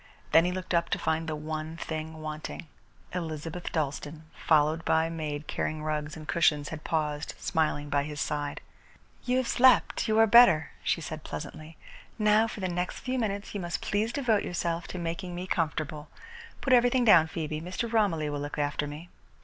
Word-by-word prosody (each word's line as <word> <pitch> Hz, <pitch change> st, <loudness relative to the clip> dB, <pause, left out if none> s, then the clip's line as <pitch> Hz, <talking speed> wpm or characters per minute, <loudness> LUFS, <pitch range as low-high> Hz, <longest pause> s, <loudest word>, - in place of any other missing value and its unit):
Then 165 Hz, +1 st, +6 dB
he 180 Hz, -, +1 dB
looked 185 Hz, 0 st, -4 dB
up 170 Hz, 0 st, +2 dB
to -, -, 0 dB
find 160 Hz, 0 st, -1 dB
the 155 Hz, -, -2 dB
one 155 Hz, +1 st, -5 dB
thing 160 Hz, -1 st, -5 dB
wanting. 155 Hz, +2 st, -6 dB, 0.5 s
Elizabeth 165 Hz, 0 st, -4 dB
Dalstan, 150 Hz, 0 st, -3 dB
followed 155 Hz, +1 st, +2 dB
by 160 Hz, 0 st, +3 dB
a -, -, -3 dB
maid 155 Hz, -2 st, -4 dB
carrying 155 Hz, +1 st, -3 dB
rugs 150 Hz, 0 st, -3 dB
and 155 Hz, -1 st, -10 dB
cushions, 150 Hz, -4 st, +2 dB
had 160 Hz, -1 st, -7 dB
paused, 150 Hz, -2 st, -2 dB
smiling, 155 Hz, -3 st, 0 dB
by 145 Hz, 0 st, +1 dB
his 150 Hz, +1 st, -6 dB
side. 145 Hz, +3 st, -2 dB, 0.6 s
"You 250 Hz, +1 st, +2 dB
have 260 Hz, -2 st, 0 dB
slept 255 Hz, 0 st, +4 dB
and -, -, -1 dB
you 220 Hz, 0 st, +2 dB
are 225 Hz, -, +7 dB
better," 220 Hz, -8 st, +6 dB
she -, -, 0 dB
said 155 Hz, -1 st, -6 dB
pleasantly. 155 Hz, +1 st, -8 dB, 0.4 s
"Now 215 Hz, 0 st, +4 dB
for 215 Hz, -, -7 dB
the 185 Hz, -, 0 dB
next 180 Hz, 0 st, -3 dB
few 255 Hz, 0 st, -2 dB
minutes 200 Hz, -3 st, -3 dB
you 205 Hz, -, -3 dB
must 175 Hz, -1 st, -3 dB
please 215 Hz, +3 st, 0 dB
devote 235 Hz, -6 st, +1 dB
yourself 170 Hz, 0 st, -2 dB
to -, -, -6 dB
making 175 Hz, +1 st, -4 dB
me 180 Hz, +1 st, -4 dB
comfortable. 155 Hz, -4 st, -2 dB, 0.5 s
Put 265 Hz, -, +2 dB
everything 245 Hz, 0 st, +4 dB
down, 170 Hz, -7 st, +7 dB
Phoebe. 155 Hz, -1 st, -4 dB
Mr. 185 Hz, +7 st, -4 dB
Romilly 180 Hz, -9 st, +2 dB
will 145 Hz, -, -3 dB
look 145 Hz, +2 st, -5 dB
after 145 Hz, 0 st, -1 dB
me." 150 Hz, +4 st, -8 dB
160 Hz, 190 wpm, -28 LUFS, 155-185 Hz, 0.6 s, are